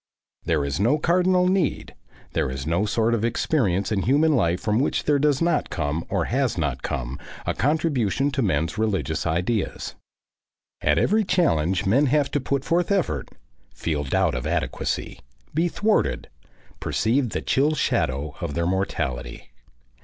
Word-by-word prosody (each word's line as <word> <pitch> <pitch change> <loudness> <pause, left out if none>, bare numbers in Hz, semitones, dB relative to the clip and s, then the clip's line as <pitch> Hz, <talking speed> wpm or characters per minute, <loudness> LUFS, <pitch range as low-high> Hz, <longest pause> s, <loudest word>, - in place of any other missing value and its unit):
There 75 -4 +1
is 70 +2 -2
no 120 +9 +3
cardinal 180 +3 +3
need, 185 -5 0 0.4
there - - 0
is 65 +1 -5
no 85 +7 +1
sort 115 +2 +1
of 115 -2 0
experience 110 - 0
in 100 -2 +1
human 145 +7 +3
life 85 -7 +1
from 105 +1 0
which 140 - 0
there 145 -1 +2
does 145 +1 +2
not 170 - +1
come 75 0 -2
or - - 0
has 130 -4 0
not 70 -6 -1
come 65 +3 -4 0.3
a - - 0
contribution 140 - +1
to 140 -1 -1
men's 80 - 0
religious 90 -9 -1
ideas. 90 +7 -1 0.9
At 75 +1 +2
every 215 - +3
challenge 95 - +1
men 130 +10 +3
have 140 0 +2
to 145 - +1
put 140 +1 -2
forth 175 +4 +1
effort, 150 - 0 0.5
feel 75 -3 -2
doubt 65 - +1
of - - -3
adequacy, - - -2 0.3
be 165 +3 +2
thwarted, 210 +5 0 0.5
perceive 125 +3 0
the - - -3
chill 150 +4 +2
shadow 75 - 0
of 70 - -3
their 85 0 0
mortality. 85 -10 -3
115 Hz, 155 wpm, -24 LUFS, -, 0.9 s, no